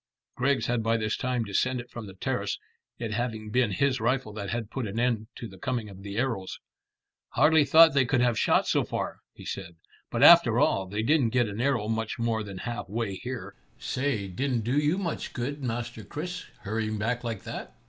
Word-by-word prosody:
Griggs 135 +2 +1
had 120 -1 0
by 115 +1 +2
this 110 -1 -1
time 125 -2 -1
descended 120 +4 -1
from 115 -3 -7
the 95 - -11
terrace, - - -2 0.4
it 115 -2 -4
having 110 -1 -3
been 125 -1 +3
his 130 +6 +1
rifle 120 -1 0
that 100 -2 -5
had 115 -2 -3
put 130 -5 -3
an 105 +3 -3
end 115 -3 +1
to 115 - -6
the 95 -3 -14
coming 120 -3 -2
of 95 -1 -11
the 100 +1 -6
arrows. 115 -7 -2 0.7
"Hardly 150 +5 +5
thought 160 +2 +7
they 135 -2 +4
could 130 -1 +2
have 120 -2 +2
shot - - +3
so - - +2
far," - - -4 0.2
he - - -12
said; 85 -3 -6 0.3
"but - - +1
after - - +8
all, 95 -1 +2
they 105 +3 -2
didn't 140 -1 +3
get 120 0 +2
an 105 +2 -4
arrow 125 -5 +1
much 110 0 -2
more 115 -1 0
than 100 -3 -7
half 120 +1 -5
way 110 -1 -2
here. 125 +5 -6 0.2
Say, 125 -7 -1
didn't 120 +6 -1
do 120 +5 -1
you 150 +4 +2
much 180 -5 -3
good, 140 +4 -3
Master 120 -2 -4
Chris, 175 - -5 0.2
hurrying 110 +1 -2
back 120 +4 -1
like 115 -4 -4
that." - - -7
115 Hz, 205 wpm, -28 LUFS, 110-130 Hz, 0.7 s, after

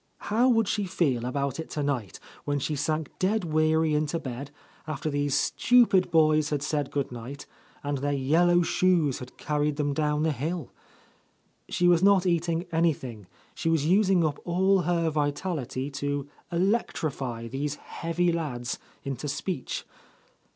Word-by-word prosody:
How 240 +4 +4
would 225 -4 +3
she 205 -1 0
feel 135 -10 0
about 140 +3 -2
it 160 - -5
tonight, 140 - -2 0.2
when 145 0 -1
she 145 +2 -2
sank 155 +2 -1
dead 200 +2 +1
weary 155 -1 +2
into 150 +2 0
bed, 135 -2 -6 0.4
after 155 0 -3
these 145 -1 0
stupid 230 -7 +4
boys 155 -2 +4
had 145 -2 -1
said 145 -2 -1
good 140 -3 -2
night, 125 +4 -8 0.4
and 145 -1 -2
their 145 +2 -1
yellow 165 +6 +3
shoes 170 -6 +2
had 125 0 -10
carried 150 0 0
them 145 -1 0
down 150 0 0
the 160 - +2
hill? 155 +3 -3 1.0
She 175 - +2
was 175 -1 +5
not 195 -1 +5
eating 170 -1 0
anything, 135 - -1 0.3
she 165 - -2
was 160 -3 +2
using 190 -1 +4
up 150 -2 -1
all 190 +3 +3
her 170 -1 +1
vitality 145 -2 -2
to 145 0 -3 0.2
electrify 155 - -1
these 140 +4 -3
heavy 170 +3 -1
lads 135 -8 -3 0.2
into 135 +1 -4
speech. 140 -1 -3
155 Hz, 150 wpm, -27 LUFS, 140-175 Hz, 1.0 s, was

